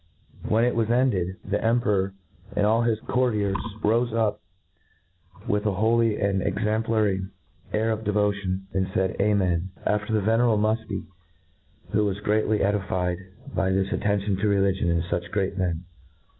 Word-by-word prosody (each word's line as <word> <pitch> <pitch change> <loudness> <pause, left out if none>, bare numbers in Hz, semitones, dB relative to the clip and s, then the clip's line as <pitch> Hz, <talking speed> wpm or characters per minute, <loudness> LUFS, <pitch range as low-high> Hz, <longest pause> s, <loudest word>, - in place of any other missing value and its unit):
When 115 +2 +3
it 125 - +2
was 115 -1 0
ended, 115 -8 +1
the 105 +1 -1
Emperor 105 -5 +1 0.4
and 105 - +2
all 110 +2 +3
his 115 -2 +1
courtiers 105 -6 0 0.3
rofe 115 +3 +2
up, 110 -2 0 1.1
with 105 +1 +1
a 105 - +1
holy 110 +2 +2
and 100 -1 +1
exauiplary 105 -2 0 0.4
air 110 +1 +1
of 110 0 -2
devotion, 100 -3 0
and 95 0 -1
faid. 95 0 0
Amen! 95 -4 +1 0.2
after 105 +1 0
the 110 -1 +2
venerable 115 +2 +3
Mufti, 110 +1 -1 0.9
who 105 0 +2
was 100 -1 -1
greatly 105 +1 +1
edified 95 -3 0 0.3
by 95 - +1
this 95 0 0
attention 100 -1 0
to 105 +2 0
religion 95 -3 +2
in 85 -1 +1
fuch 85 0 -3
great 100 -1 -1
men. 90 -3 -1
105 Hz, 145 wpm, -25 LUFS, 95-110 Hz, 1.1 s, When